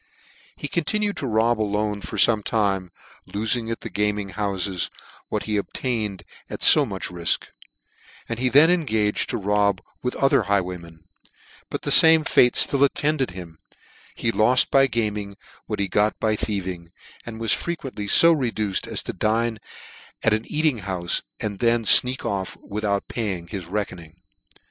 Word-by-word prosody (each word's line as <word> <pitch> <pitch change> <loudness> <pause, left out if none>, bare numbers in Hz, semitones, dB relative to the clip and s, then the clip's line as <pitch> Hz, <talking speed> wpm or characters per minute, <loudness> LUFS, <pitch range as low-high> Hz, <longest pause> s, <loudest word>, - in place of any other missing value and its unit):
He - - -5
continued 205 +7 -1
to 135 - -3
rob 110 0 +1
alone 105 0 -2
for 105 - -7
fome 105 +1 +3
time, 100 -5 -1 0.4
lofing 110 +3 0
at 115 - -4
the 115 - -7
gaming 105 0 -1
houfes 95 -2 -2 0.4
what - - -2
he 105 -1 -2
obtained 105 -2 -3 0.3
at - - -5
fo - - +7
much - - -5
ri(k, 85 -1 -1 0.8
and 115 0 -5
he 130 0 +1
then 150 +6 +6
engaged 110 -12 0
to - - -2
rob 100 -1 +1 0.2
with 125 - -3
other 135 - +3
highwaymen; 90 -4 -3 0.7
but - - -5
the - - -2
fame 160 -1 +7
fate 125 -5 +3
ftill 140 0 +5
attended 140 0 +1
him: 85 -3 -10 0.6
he 115 - -1
loft 115 +5 +3
by 135 0 +5
gaming, 105 -4 -3 0.3
what - - -4
he 100 - 0
got 105 +3 0
by 110 -1 +1
thiev 100 -3 -2
ing, 85 -2 -7 0.3
and 115 -1 -9
was 115 -2 +2
frequently 135 -11 -4
fo 165 +10 +6
reduced 115 - -1
as - - -4
to - - -5
dine 110 +3 -1 0.6
at 110 - +3
an 110 +1 -1
eating 150 -5 0
houfe, 90 -3 -1 0.2
and 100 -2 -4
then 115 -1 +2
fneak 125 +4 +5
off 95 -2 -3
without 100 -1 -3
paying 95 -7 -4
his 95 -5 -6
reckoning. 90 -4 -5
105 Hz, 160 wpm, -23 LUFS, 100-120 Hz, 0.8 s, fo